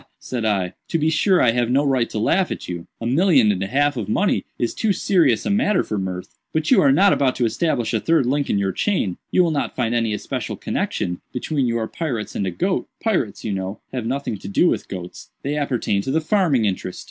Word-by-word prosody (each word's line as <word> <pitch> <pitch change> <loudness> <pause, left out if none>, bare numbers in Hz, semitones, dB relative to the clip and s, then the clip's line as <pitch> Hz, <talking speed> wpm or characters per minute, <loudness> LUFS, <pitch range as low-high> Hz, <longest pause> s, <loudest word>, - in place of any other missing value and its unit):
said 125 -3 -4
I, 95 -4 0
"to - - 0
be 160 0 +1
sure 185 +3 +3
I 120 - +5
have 120 0 0
no 140 +4 +2
right 130 -4 +1
to - - -5
laugh 175 - +2
at - - -5
you—a 90 +5 -7
million 135 - +4
and 95 -2 -2
a 95 - -1
half 145 +4 +1
of 105 -3 -3
money 195 - +1
is 120 - -1
too 220 -3 +1
serious 170 - +2
a - - 0
matter 210 0 +2
for 105 - -3
mirth—but 95 - -4
you - - +6
are 140 - +5
not 195 +8 +5
about 135 -2 +1
to 125 - +1
establish 120 -2 0
a 110 - +2
third 165 -2 +2
link 140 +3 0
in - - +2
your 100 -1 0
chain—you 180 - 0
will 170 - +1
not 145 - -2
find 120 -2 0
any 115 -2 +1
especial - - -4
connexion 90 0 -2
between 135 +1 -1
your 115 -1 -1
pirates 125 -10 -4
and 100 - -2
a - - +1
goat—pirates, 180 - -2
you 105 - -2
know, 95 +1 -4
have 125 -3 -3
nothing 130 -5 -3
to - - -9
do 100 - +3
with - - 0
goats; 90 -2 -8
they 145 +2 -1
appertain 125 -8 0
to 115 - -5
the 155 +4 +2
farming 160 - +2
interest." 95 -2 -3
125 Hz, 225 wpm, -21 LUFS, 105-160 Hz, -, you